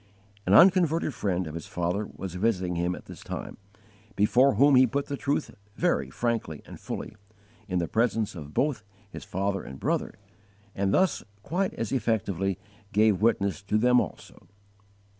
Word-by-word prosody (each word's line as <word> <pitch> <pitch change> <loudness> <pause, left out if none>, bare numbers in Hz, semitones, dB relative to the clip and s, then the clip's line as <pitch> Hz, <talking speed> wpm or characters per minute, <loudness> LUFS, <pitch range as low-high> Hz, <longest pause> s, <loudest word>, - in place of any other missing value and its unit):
An 95 - +5
unconverted 170 - +5
friend 95 -5 -1
of 75 - -7
his 85 -1 -7
father 90 +4 -2
was 95 -3 -6
visiting 90 -2 0
him 90 +1 0
at - - -12
this - - -11
time, - - -6 0.6
before 120 +5 +4
whom 140 +6 +5
he 130 0 +7
put 140 +3 -1
the 140 - -4
truth 145 +2 -1 0.2
very 65 - +1
frankly 115 - -2
and - - -11
fully, - - -6 0.5
in 90 -3 -1
the 85 -1 0
presence 115 0 0
of 75 -5 -9
both 140 - 0 0.3
his - - -8
father 95 +1 -2
and 65 0 -10
brother, - - -1 0.6
and 100 0 0
thus 185 - +2 0.2
quite 185 - -1
as 115 - -3
effectively 100 -7 0 0.3
gave 105 -2 +3
witness 100 -6 +1
to 100 +1 0
them 125 +2 +4
also. - - -9
105 Hz, 160 wpm, -27 LUFS, 90-125 Hz, 0.6 s, he